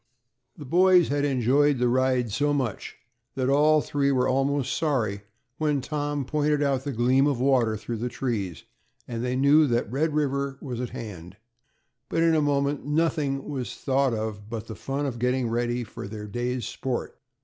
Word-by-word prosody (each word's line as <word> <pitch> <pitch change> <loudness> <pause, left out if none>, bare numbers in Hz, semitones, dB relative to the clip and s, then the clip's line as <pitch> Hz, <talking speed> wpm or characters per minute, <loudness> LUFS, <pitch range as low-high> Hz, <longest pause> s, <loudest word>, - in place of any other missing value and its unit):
The 150 - -9
boys 180 +3 +5
had 145 +1 +1
enjoyed 140 +2 +3
the 125 0 +2
ride 130 -2 +1
so 145 +6 +1
much, 130 -7 -3 0.4
that 130 0 0
all 150 +2 +4
three 140 -1 0
were 130 -1 +2
almost 135 0 0
sorry 115 -11 0 0.4
when 150 -2 +1
Tom 145 +1 -3
pointed 150 +1 +1
out 135 -2 0
the 145 - -2
gleam 130 +3 +3
of 140 -4 0
water 125 -5 +2
through 115 +2 -5
the 120 +3 -3
trees, 110 - -3 0.4
and 115 -1 -4
they 125 0 -1
knew 145 +3 +5
that 120 -4 0
Red 150 +3 0
River 140 -2 -1
was 125 -4 -5
at 125 - -3
hand; 90 -6 -8 0.7
but 165 - +1
in 165 -1 +4
a 155 - +3
moment 140 -1 0
nothing 150 -2 0
was 135 -4 -4
thought 135 -2 +1
of 110 -1 -5
but 115 -1 -5
the 115 - -7
fun 140 +2 -3
of 125 -4 -4
getting 125 0 +1
ready 120 +1 -1
for 105 - -8
their 105 0 -7
day's 120 +3 -3
sport. 130 -2 -4
135 Hz, 180 wpm, -26 LUFS, 120-145 Hz, 0.7 s, boys